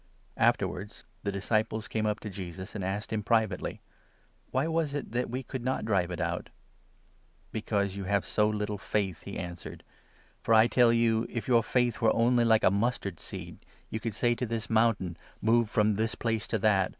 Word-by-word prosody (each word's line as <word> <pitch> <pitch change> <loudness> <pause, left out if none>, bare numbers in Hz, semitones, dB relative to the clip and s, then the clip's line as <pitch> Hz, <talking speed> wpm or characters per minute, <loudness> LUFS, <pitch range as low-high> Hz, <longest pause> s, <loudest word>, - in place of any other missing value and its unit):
Afterwards 100 +4 0 0.2
the 100 - -2
disciples 110 +2 -1
came 110 -1 -1
up 105 0 0
to 110 - -5
Jesus, 95 -1 -7
and 105 - -4
asked 100 +4 -3
him 110 - 0
privately: 110 +1 0 0.7
"Why 130 +3 +1
was 160 -3 0
it 145 - -4
that 125 +1 -1
we 130 +3 -3
could 130 0 -6
not 130 -2 -1
drive 95 -5 +1
it 90 -1 -5
out? 85 0 -2 0.5
" - - -36
"Because 100 -3 -1
you 100 -1 -5
have 100 +1 +1
so 105 0 +2
little 105 -1 -2
faith," 95 -6 -1
he - - -6
answered; 85 -1 -7 0.6
"for, 115 - +3
I 110 +1 +7
tell 120 0 +4
you, 115 -1 +2
if 115 - -4
your 120 -2 +5
faith 120 0 0
were 115 - +4
only 120 +1 +4
like 110 -1 +4
a - - +5
mustard 100 -4 -1
seed, - - -8 0.3
you 110 - -2
could 115 -2 -4
say 120 0 +2
to 120 +2 -2
this 115 0 -3
mountain 110 -6 +2
' - - -30
Move 115 0 +3
from 105 0 +3
this 110 +2 -1
place 115 -2 -1
to 110 - 0
that 100 -3 +3
110 Hz, 200 wpm, -29 LUFS, 100-115 Hz, 0.7 s, I